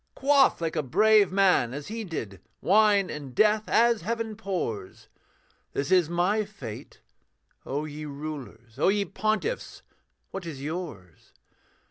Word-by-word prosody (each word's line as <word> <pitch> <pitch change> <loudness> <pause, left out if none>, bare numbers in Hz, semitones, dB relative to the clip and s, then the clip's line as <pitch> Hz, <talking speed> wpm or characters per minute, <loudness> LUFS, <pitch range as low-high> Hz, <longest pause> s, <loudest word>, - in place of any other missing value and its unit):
Quaff, 275 0 +4
like 165 -1 -2
a 155 - +1
brave 210 - +4
man, 185 -11 +3
as 145 0 -7
he 225 +1 -4
did, 110 - -6 0.2
Wine 205 0 +4
and 140 -4 -8
death 215 +3 +3
as 235 -1 +4
heaven 225 +3 -3
pours 180 - -5 0.6
This 140 +6 -2
is 180 -4 +4
my 180 +5 +1
fate: 140 - -10 0.7
O 145 +3 -2
ye 150 0 -7
rulers, 140 -6 -8
O - - +3
ye 200 +1 +2
pontiffs, 215 - -2 0.5
what 195 - -5
is 150 -5 -6
yours? 140 - -7
180 Hz, 135 wpm, -27 LUFS, 145-215 Hz, 0.7 s, Quaff